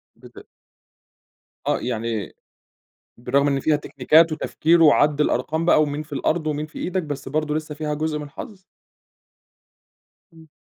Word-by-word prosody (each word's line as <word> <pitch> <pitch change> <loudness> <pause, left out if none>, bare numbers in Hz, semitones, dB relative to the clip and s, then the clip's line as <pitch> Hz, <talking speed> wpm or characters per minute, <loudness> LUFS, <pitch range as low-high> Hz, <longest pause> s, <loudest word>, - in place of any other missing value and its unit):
بت - - -15 1.2
آه، - - +1
يعني 115 -5 -3 0.8
بالرغم 135 +4 +1
إن 140 -1 +1
فيها 155 +2 +2
تكنيكات 155 +3 +3
وتفكير 165 +2 +1
وعَدّ 150 0 +4
الأرقام 160 +2 0
بقى، 165 - +5
ومين 150 0 -2
في 150 -1 -11
الأرض 155 +3 -1
ومين 150 0 -2
في 155 - -11
إيدك، 185 -1 -2
بس 145 -3 -6
برضو 150 +1 -1
لسه 155 -1 -4
فيها 150 0 -3
جزء 155 0 -2
من 150 - -6
الحظ؟ 190 - -10 1.7
إمم. 160 -1 -17
150 Hz, 140 wpm, -22 LUFS, 145-160 Hz, 1.7 s, بقى